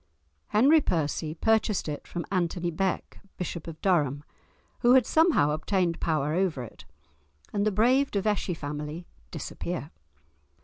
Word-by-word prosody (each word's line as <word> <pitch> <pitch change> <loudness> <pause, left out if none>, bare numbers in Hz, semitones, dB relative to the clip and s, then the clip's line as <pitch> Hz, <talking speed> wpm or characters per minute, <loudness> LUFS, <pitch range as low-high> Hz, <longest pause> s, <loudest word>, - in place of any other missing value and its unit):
Henry 280 +9 +5
Percy 155 - -1
purchased 220 0 +1
it 150 -1 -5
from 175 - -5
Anthony 175 -2 0
Bek, 185 +3 -2 0.2
Bishop 170 -2 -5
of 160 -1 -8
Durham, 145 -7 +2 0.6
who 240 0 +5
had 255 -3 +5
somehow 315 - +3
obtained 170 +2 0
power 155 -2 0
over 170 -7 0
it, 115 - -12 0.7
and 205 0 +1
the - - +2
brave 250 +7 +3
De 200 - -1
Vesci 200 -3 -1
family 150 +3 -6 0.2
disappear. 165 0 -5
175 Hz, 135 wpm, -27 LUFS, 155-210 Hz, 0.7 s, Henry